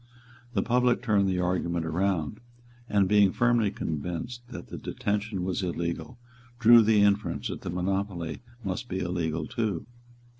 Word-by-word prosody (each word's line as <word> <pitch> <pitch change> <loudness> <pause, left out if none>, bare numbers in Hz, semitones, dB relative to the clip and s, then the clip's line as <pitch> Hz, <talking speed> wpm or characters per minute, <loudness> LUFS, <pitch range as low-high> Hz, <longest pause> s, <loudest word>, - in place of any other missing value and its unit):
The 100 - +1
public 125 0 +2
turned 100 -4 +3
the 90 -1 0
argument 85 -2 0
round, 80 -2 -1 0.5
and, 100 -2 +3
being 100 -1 +5
firmly 120 -2 +2
convinced 90 - -4
that 120 - -9
the - - -6
detention 105 -2 -2
was 95 +1 -1
illegal, 85 +5 -3 0.4
drew 120 0 +8
the 110 -1 +4
inference 100 +1 +1
that - - -5
the - - -5
monopoly 90 -2 -2 0.2
must 110 +6 -4
be 95 - -2
illegal 85 -4 -2
too. 110 -8 -2
100 Hz, 145 wpm, -28 LUFS, 90-110 Hz, 0.5 s, drew